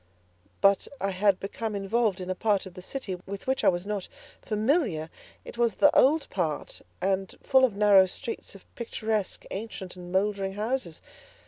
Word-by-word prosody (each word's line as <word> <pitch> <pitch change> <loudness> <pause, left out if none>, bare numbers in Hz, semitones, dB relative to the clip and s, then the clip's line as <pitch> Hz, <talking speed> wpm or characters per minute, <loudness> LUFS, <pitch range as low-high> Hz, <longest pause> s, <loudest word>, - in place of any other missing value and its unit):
But 195 0 +4
I 195 -3 -1
had 195 0 +2
become 215 +2 -4
involved 200 0 +1
in 185 0 -4
a - - +1
part 205 +1 +1
of 190 - -10
the 180 - -9
city 195 -2 -4
with 200 0 -6
which 265 0 0
I - - +7
was 175 +1 -1
not 205 -2 -3 0.3
familiar; 215 - 0 0.3
it 235 - -10
was 235 -3 +2
the 295 - +5
old 295 +3 +5
part, 165 -6 -2 0.2
and 190 0 0
full 265 -1 +4
of 240 -6 +3
narrow 200 -2 +6
streets 230 +1 -6
of 195 - -14
picturesque, 220 -3 -2
ancient, 195 -3 -6
and 180 -1 -9
mouldering 195 0 0
houses. 210 -5 -3
200 Hz, 175 wpm, -27 LUFS, 190-225 Hz, 0.3 s, I